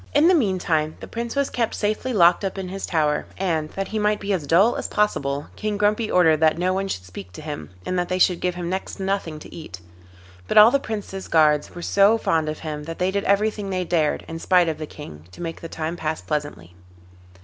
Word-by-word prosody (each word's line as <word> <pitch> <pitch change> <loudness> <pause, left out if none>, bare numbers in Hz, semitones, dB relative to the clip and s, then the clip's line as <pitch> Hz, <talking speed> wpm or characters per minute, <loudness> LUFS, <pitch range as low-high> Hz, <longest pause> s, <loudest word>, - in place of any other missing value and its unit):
In 295 +3 +6
the 370 - +6
meantime 180 - +1
the - - -9
Prince 235 +2 -5
was 280 -1 0
kept 230 -2 -1
safely 215 +5 -1
locked 175 -4 +4
up 195 0 -3
in 190 -1 -4
his 195 +1 -5
tower, 150 -3 0
and, 165 -5 -1
that 195 0 -3
he 220 - -2
might 210 0 +1
be 200 0 -2
as 160 -7 -2
dull 195 - +4
as - - -3
possible, 145 -9 0
King 210 -1 -2
Grumpy 210 +2 +1
ordered 165 -4 +4
that 160 0 +3
no 180 +2 +1
one 195 +1 -1
should 90 - -4
speak 90 0 -10
to - - -9
him, 145 - -6 0.2
and 185 - -1
that 175 - -2
they 185 - 0
should 180 -1 +3
give 180 -1 -1
him 175 -1 -4
next 190 +2 -3
to 195 - -6
nothing 190 -5 -2
to 150 - -12
eat. 155 - -9 0.7
But - - 0
all 215 +2 +9
the 280 - +3
Prince's 205 -5 -6
guards 150 -2 +3
were 175 - -7
so 200 +5 +4
fond 160 -7 0
of 155 - -4
him 150 -2 -5
that 165 +1 -6
they 185 +1 0
did 200 0 -2
everything 205 0 +1
they 185 -1 -1
dared, 160 -3 0
in 165 0 -6
spite 180 0 +3
of 155 -1 -2
the 155 - -5
King, 80 - -11
to - - -14
make 165 -1 -5
the 165 - -7
time 160 +1 -4
pass 160 -2 -3
pleasantly. 145 - -4
180 Hz, 240 wpm, -23 LUFS, 155-200 Hz, 0.7 s, all